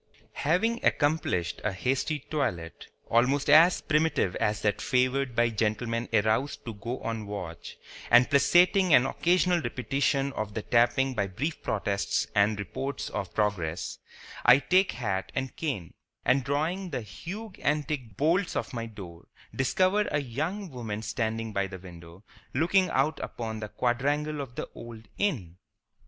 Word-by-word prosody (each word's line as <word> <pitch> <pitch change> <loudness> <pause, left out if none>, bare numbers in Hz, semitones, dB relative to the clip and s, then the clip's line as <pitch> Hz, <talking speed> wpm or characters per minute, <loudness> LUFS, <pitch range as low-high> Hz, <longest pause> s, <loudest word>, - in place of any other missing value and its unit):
Having 215 +11 +1
accomplished 145 - +1
a 105 - 0
hasty 130 - -1
toilet, 90 - -3 0.2
almost 125 +5 +2
as 165 +4 +7
primitive 150 - +1
as 105 0 -1
that 105 -1 +1
favored 130 0 +1
by 120 0 +3
gentlemen 115 +2 -1
aroused 110 +5 +1
to 115 - -5
go 115 +5 -5
on 115 -2 -4
watch, 90 -5 -7 0.3
and 125 - +7
placating 175 +4 +5
an 125 - +5
occasional 180 +4 +2
repetition 135 +2 0
of 105 -4 -4
the 110 - -3
tapping 125 +3 +2
by 100 -5 -1
brief 140 - -4
protests 100 -1 -1
and 105 +1 +3
reports 135 +8 -4
of 95 - -4
progress, 90 -6 -1 0.4
I 125 - +8
take 185 +6 +2
hat 95 -6 -3
and 130 0 -3
cane, 125 - -4 0.3
and 130 +1 +3
drawing 160 +8 -1
the 125 - -3
huge 185 - -8
antique 145 -8 -2
bolts 170 +6 +1
of - - -3
my 115 -1 -4
door, 95 -6 -11 0.3
discover 185 +10 +2
a 145 - +1
young 155 - -4
woman 110 -4 -5
standing 110 0 -2
by 100 -1 0
the 95 -1 -8
window 85 0 -13 0.3
looking 185 +3 +3
out 150 +4 +1
upon 110 -2 -5
the 105 -1 -6
quadrangle 145 +6 0
of 125 -3 -8
the - - -4
old 115 -2 -10
Inn. 105 - -1
125 Hz, 145 wpm, -28 LUFS, 105-150 Hz, 0.4 s, I